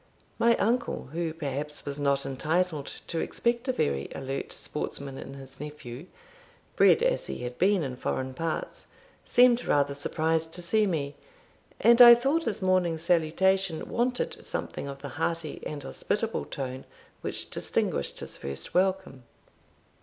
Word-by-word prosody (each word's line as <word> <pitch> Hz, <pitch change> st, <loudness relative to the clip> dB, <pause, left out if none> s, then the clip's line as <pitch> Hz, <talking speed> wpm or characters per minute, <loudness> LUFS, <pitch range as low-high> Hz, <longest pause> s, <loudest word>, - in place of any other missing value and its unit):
My 235 Hz, 0 st, +4 dB
uncle, 235 Hz, -, 0 dB
who, 165 Hz, -1 st, -1 dB
perhaps, 150 Hz, -1 st, -3 dB
was 140 Hz, 0 st, -4 dB
not 140 Hz, -1 st, +1 dB
entitled 155 Hz, +3 st, -1 dB, 0.2 s
to 165 Hz, -, -3 dB
expect 235 Hz, +7 st, 0 dB
a -, -, +3 dB
very 70 Hz, -, -1 dB
alert 135 Hz, 0 st, -4 dB
sportsman 140 Hz, -2 st, -4 dB
in 135 Hz, -, -8 dB
his 135 Hz, 0 st, -10 dB
nephew, 150 Hz, 0 st, -8 dB, 0.7 s
bred 460 Hz, -, +5 dB
as -, -, +1 dB
he -, -, -5 dB
had 125 Hz, 0 st, -6 dB
been 190 Hz, -1 st, +3 dB
in 130 Hz, -3 st, -4 dB
foreign 130 Hz, +1 st, -2 dB
parts, 165 Hz, +3 st, -3 dB, 0.4 s
seemed 245 Hz, 0 st, +5 dB
rather 145 Hz, -1 st, +2 dB
surprised 160 Hz, +3 st, -1 dB
to 175 Hz, -, 0 dB
see 215 Hz, +4 st, +3 dB
me, 145 Hz, -5 st, -2 dB, 0.6 s
and 235 Hz, +1 st, +6 dB
I 240 Hz, -1 st, +12 dB
thought 275 Hz, +7 st, +1 dB
his 205 Hz, -3 st, -2 dB
morning 185 Hz, -3 st, +2 dB
salutation 175 Hz, +2 st, +1 dB
wanted 245 Hz, +1 st, -1 dB
something -, -, -4 dB
of 140 Hz, 0 st, -8 dB
the 140 Hz, -, -5 dB
hearty 165 Hz, -2 st, -2 dB
and 145 Hz, -2 st, -6 dB
hospitable 220 Hz, +10 st, -2 dB
tone 130 Hz, -1 st, -5 dB, 0.4 s
which -, -, -3 dB
distinguished 70 Hz, -, -1 dB
his -, -, -6 dB
first 70 Hz, 0 st, -6 dB
welcome. 185 Hz, -7 st, +1 dB
160 Hz, 145 wpm, -28 LUFS, 140-195 Hz, 0.7 s, I